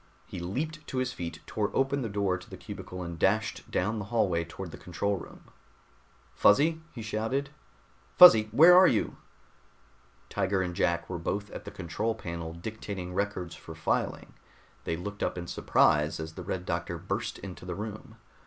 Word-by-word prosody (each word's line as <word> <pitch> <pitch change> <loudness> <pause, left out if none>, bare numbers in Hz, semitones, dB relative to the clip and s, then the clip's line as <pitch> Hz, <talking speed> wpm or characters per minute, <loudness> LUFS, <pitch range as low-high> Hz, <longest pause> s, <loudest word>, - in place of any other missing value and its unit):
He - - -7
leaped 150 - -4
to 130 - -4
his 130 -1 0
feet, 85 -1 -6
tore 105 -2 -1
open 135 +1 +1
the 115 - -2
door 100 -2 0
to 90 - -10
the - - -8
cubicle 90 0 -7
and 85 -1 -6
dashed 105 +5 +1
down 105 +4 0
the 105 - -4
hallway 95 -7 +1
toward 85 +1 -8
the - - -9
control 100 +3 -1
room. - - -11 0.9
"Fuzzy!" 160 +9 +4
he 120 -7 -7
shouted. 115 +6 -2 0.7
"Fuzzy, 110 -12 +10
where 165 +10 +8
are 185 +1 +9
you?" 110 - 0 1.1
Tiger 95 -1 0
and 90 -1 -3
Jack 85 -2 +1
were 90 -2 -4
both 100 +4 -3
at - - -8
the - - -5
control 105 +5 -3
panel 85 -5 -5
dictating 90 0 -6
records 95 -3 -2
for - - -10
filing. - - -1 0.5
They 80 - -1
looked 100 +4 -6
up - - -1
in 85 - -4
surprise 75 -2 +2
as 80 0 -5
the 90 - -7
Red 90 0 -4
Doctor 85 0 -2
burst 100 +7 -3
into 95 -3 -9
the 90 -1 -5
room. 105 +1 -7
100 Hz, 175 wpm, -29 LUFS, 85-110 Hz, 1.1 s, Fuzzy